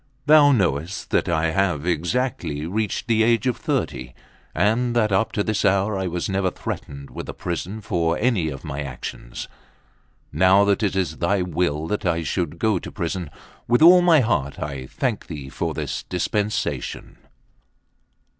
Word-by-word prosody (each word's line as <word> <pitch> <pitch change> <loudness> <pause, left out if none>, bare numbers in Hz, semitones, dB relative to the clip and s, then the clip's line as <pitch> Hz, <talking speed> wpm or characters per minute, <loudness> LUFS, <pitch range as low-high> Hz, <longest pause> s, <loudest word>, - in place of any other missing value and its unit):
Thou 150 -1 +7
knowest 90 - 0
that - - +1
I 80 -1 +1
have 90 -5 0
exactly 85 - -1
reached 105 +4 -2
the 115 -2 +2
age 115 +2 +3
of 125 -2 +1
thirty, 65 -1 -3 0.4
and 120 +3 +1
that 110 -3 +2
up 95 +4 +2
to 105 - 0
this 110 -1 -1
hour 100 +1 +2
I 95 -1 -2
was 90 0 -2
never 95 -1 0
threatened 70 -5 -7
with - - -7
a - - -6
prison 90 +5 -4
for 85 -4 0
any 105 -9 +1
of 70 -2 -8
my 75 -3 -4
actions. 65 -3 -7 0.9
Now 95 +5 +5
that 100 +1 +2
it 100 -3 0
is 95 -2 -1
thy 90 +2 +1
will 85 -3 -1
that 105 +5 -2
I 85 -2 0
should 85 +1 -2
go 105 -1 +1
to - - -9
prison, 85 -1 -3 0.4
with 120 +6 +4
all 180 +2 +9
my 170 -4 +5
heart 80 - 0
I 70 -3 -5
thank - - -2
thee 70 -3 -7
for - - -3
this - - -3
dispensation." 105 0 -2
95 Hz, 165 wpm, -23 LUFS, 80-110 Hz, 0.9 s, all